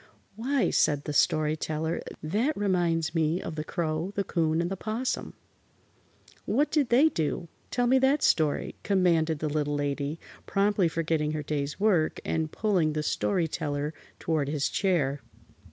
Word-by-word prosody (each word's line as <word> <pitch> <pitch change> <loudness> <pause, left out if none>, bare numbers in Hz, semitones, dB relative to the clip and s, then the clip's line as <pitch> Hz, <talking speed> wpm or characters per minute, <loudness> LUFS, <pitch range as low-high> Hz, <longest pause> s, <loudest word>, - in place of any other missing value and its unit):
"Why," 260 +5 0
said 145 -2 +2
the 150 - -4
Story 155 +1 +2
Teller, 160 +1 -2 0.2
"that 225 - 0
reminds 175 -5 +1
me 165 +1 +1
of 165 - -5
the 155 -1 -4
Crow, 160 +3 -2
the 200 - 0
'Coon 160 -3 0
and 170 +2 -1
the - - -1
'Possum." 220 +6 -3 1.1
"What 280 +8 +1
did 290 -5 +2
they 270 +7 +5
do? 165 - -2 0.2
Tell 245 - 0
me 260 +2 +4
that 270 +3 +3
story," 155 -3 +2
commanded 170 -5 +2
the 155 - -2
Little 145 -1 -1
Lady, 145 +2 -2 0.3
promptly 200 -2 +2
forgetting 160 -2 -1
her 155 -1 -3
day's 145 +1 -3
work 190 -7 +2
and 160 -1 -1
pulling 185 -8 +1
the 155 0 -2
Story 175 +2 0
Teller 150 -1 -3 0.2
toward 155 -4 -1
his 145 -2 0
chair. 150 -8 0
165 Hz, 155 wpm, -28 LUFS, 150-200 Hz, 1.1 s, they